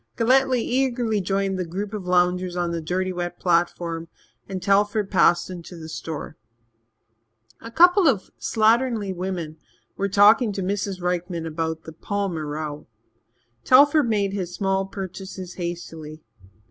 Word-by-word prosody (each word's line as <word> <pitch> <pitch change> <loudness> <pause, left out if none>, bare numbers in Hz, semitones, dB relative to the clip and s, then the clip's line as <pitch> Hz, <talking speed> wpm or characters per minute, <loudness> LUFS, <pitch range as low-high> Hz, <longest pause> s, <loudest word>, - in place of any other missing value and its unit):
Galletly 255 +1 +3
eagerly 240 -4 0
joined 195 0 -1
the - - 0
group 195 +5 -5
of 200 -4 -5
loungers 180 0 +1
on 175 -1 -1
the 170 -1 -3
dirty 185 +3 -2
wet 175 -1 -4
platform, 170 -1 0 0.4
and 190 -1 -3
Telford 200 +2 +1
passed 175 -2 +4
into 175 0 -9
the 160 -1 -9
store. 160 -1 -6 1.2
A 230 - -8
couple 355 - +5
of 195 -9 +1
slatternly 220 -3 +1
women 175 -4 -4 0.4
were 200 0 -1
talking 210 +4 +5
to 195 - -3
Mrs. 195 -1 -3
Rykman 175 -1 -2
about 160 0 -3
"the 160 - -10
Palmer 185 -3 -3
row." 150 0 -5 0.8
Telford 285 0 +5
made 200 -3 0
his 180 -3 -4
small 195 -1 0
purchases 190 -1 -7
hastily. 160 -3 -6
185 Hz, 135 wpm, -23 LUFS, 175-210 Hz, 1.2 s, couple